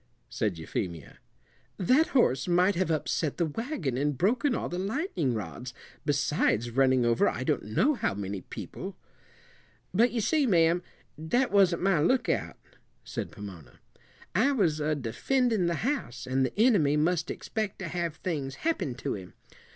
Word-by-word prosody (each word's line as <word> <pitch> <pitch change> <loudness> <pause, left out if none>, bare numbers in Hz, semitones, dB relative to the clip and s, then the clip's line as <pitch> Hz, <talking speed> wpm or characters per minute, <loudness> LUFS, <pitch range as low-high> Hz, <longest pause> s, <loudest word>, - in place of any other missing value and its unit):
said 110 -6 -1
Euphemia. 80 -1 -5 0.6
"That 260 - +3
horse 185 - +2
might 180 +3 +4
have 185 -2 0
upset 155 -1 -1
the 170 - +2
wagon 165 - -3
and 145 0 0
broken 240 - +2
all - - -2
the 175 - -4
lightning 195 - -1
rods, 115 +6 -6 0.3
besides 140 -5 +1
running 130 0 +3
over 115 0 +3
I 130 - -4
don't 145 +1 0
know 180 - +2
how 235 - -1
many 100 -1 -4
people." - - -8 1.0
"But 230 +6 +4
you 240 - -1
see, 275 +6 +2
ma'am, 170 -3 +4 0.4
that 240 +12 +1
wasn't 185 -4 +4
my 195 -4 +3
lookout," 240 - +1 0.5
said - - -5
Pomona. 90 -11 -11 0.5
"I 250 +10 +3
was 170 - +1
a 155 +1 0
defendin' 190 - 0
the 170 - 0
house, 250 - -2
and 130 +1 +1
the 130 +10 -3
enemy 190 - +4
must 165 +2 +1
expect 215 -3 -3
to 185 - -5
have 170 -1 -2
things 145 -8 -3
happen 315 - 0
to - - -3
him. 95 -3 -9
165 Hz, 155 wpm, -28 LUFS, 130-210 Hz, 1.0 s, might